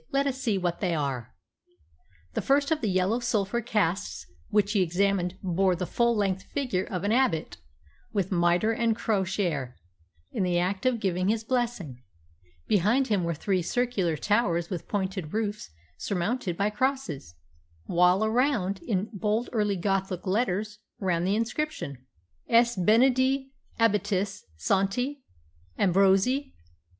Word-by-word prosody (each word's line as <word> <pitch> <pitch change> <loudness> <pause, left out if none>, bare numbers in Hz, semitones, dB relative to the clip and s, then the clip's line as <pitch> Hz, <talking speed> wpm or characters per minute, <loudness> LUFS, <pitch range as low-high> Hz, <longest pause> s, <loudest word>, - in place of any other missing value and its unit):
"Let 275 +1 +2
us 270 -1 -2
see 220 -6 +1
what 175 -2 -1
they 180 -4 0
are." 135 -6 -3 1.0
The - - -1
first 280 +3 +2
of 315 - +1
the 220 - 0
yellow 185 +5 +1
sulphur 235 -1 0
casts 200 -4 -1 0.2
which 210 -1 +2
he 205 -3 +2
examined 180 +1 +1
bore 185 0 +2
the 180 +1 -3
full 235 +6 +1
length 195 -2 0
figure 250 -10 -2
of 180 -1 -4
an 205 - +1
abbot, 235 -10 +1 0.5
with 195 -3 -1
mitre 175 +4 +3
and 225 0 +1
crosier, 185 - -1 0.6
in - - -2
the 180 -2 +1
act 190 +6 0
of 245 -2 +1
giving 185 -2 0
his 220 +1 +1
blessing. 225 - -2 0.7
Behind 220 +8 +2
him 200 -4 +2
were 170 -1 -1
three 185 +4 0
circular 195 -5 0
towers 180 -4 +1
with 180 - -4
pointed 190 -5 -3
roofs 210 -1 -2 0.3
surmounted 185 -1 -2
by 205 +1 +1
crosses, 210 - -2 0.5
while 180 +4 +3
around, 220 -5 +1
in 200 -3 -1
bold 215 +4 -1
early 210 -3 +1
Gothic 190 0 -1
letters, 205 +1 -1 0.2
ran 175 -3 0
the 195 +2 +2
inscription 230 - -3 0.3
+ 85 +1 -40
S. 235 +1 +4
BENEDITI. 260 +7 +3 0.3
ABBATIS. 205 -3 0
SANTI. 200 - 0 0.6
AMBROSII 195 +9 +3
200 Hz, 140 wpm, -27 LUFS, 180-230 Hz, 1.0 s, S